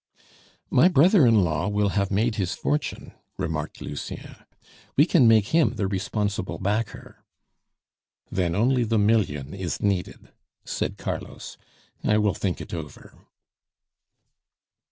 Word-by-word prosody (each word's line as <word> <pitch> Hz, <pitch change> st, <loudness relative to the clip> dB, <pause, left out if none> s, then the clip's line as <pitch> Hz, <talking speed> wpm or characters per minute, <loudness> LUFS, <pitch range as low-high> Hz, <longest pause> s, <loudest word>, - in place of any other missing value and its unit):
"My 140 Hz, +8 st, +6 dB
brother 175 Hz, -, +5 dB
in 110 Hz, -4 st, +5 dB
law 80 Hz, 0 st, -1 dB
will 105 Hz, -1 st, +1 dB
have 100 Hz, 0 st, 0 dB
made 110 Hz, +4 st, +1 dB
his 95 Hz, -4 st, -1 dB
fortune," 75 Hz, +2 st, -3 dB, 0.2 s
remarked 80 Hz, -4 st, -4 dB
Lucien; 75 Hz, -, -7 dB, 0.6 s
"we -, -, +7 dB
can 120 Hz, -, +4 dB
make 110 Hz, -3 st, +4 dB
him 160 Hz, -1 st, +2 dB
the 100 Hz, -, -1 dB
responsible 100 Hz, 0 st, -2 dB
backer." 105 Hz, +3 st, -3 dB, 1.1 s
"Then 85 Hz, -3 st, 0 dB
only 125 Hz, +4 st, +2 dB
the 115 Hz, 0 st, 0 dB
million 100 Hz, -10 st, +1 dB
is 95 Hz, -3 st, -4 dB
needed," 100 Hz, -3 st, -2 dB, 0.3 s
said -, -, -3 dB
Carlos. -, -, -6 dB, 0.5 s
"I 105 Hz, -, +3 dB
will 105 Hz, -2 st, +2 dB
think 95 Hz, -3 st, -2 dB
it -, -, -8 dB
over." 80 Hz, -4 st, -8 dB
100 Hz, 125 wpm, -25 LUFS, 90-115 Hz, 1.1 s, we